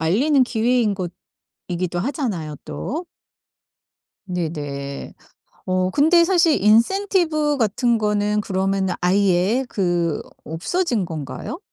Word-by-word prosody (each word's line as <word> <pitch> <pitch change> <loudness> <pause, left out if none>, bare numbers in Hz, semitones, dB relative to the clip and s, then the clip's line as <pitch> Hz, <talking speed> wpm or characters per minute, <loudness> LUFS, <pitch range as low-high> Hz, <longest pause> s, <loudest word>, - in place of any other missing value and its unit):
알리는 255 - +3
기회인 235 -2 +1 0.7
것이기도 175 0 -2
하잖아요 195 - -3
또. 320 +7 -4 1.2
네네. 145 -5 -4 0.5
어 185 0 +1
근데 320 - +4
사실 335 - +3
인센티브 305 - +3
같은 235 +1 +1
거는 210 0 +1
그러면은 190 -1 0
아예 195 +6 +2
그 175 -6 0 0.2
없어진 225 - -1
건가요? 160 - -6
205 Hz, 220 characters per minute, -21 LUFS, 175-275 Hz, 1.2 s, 근데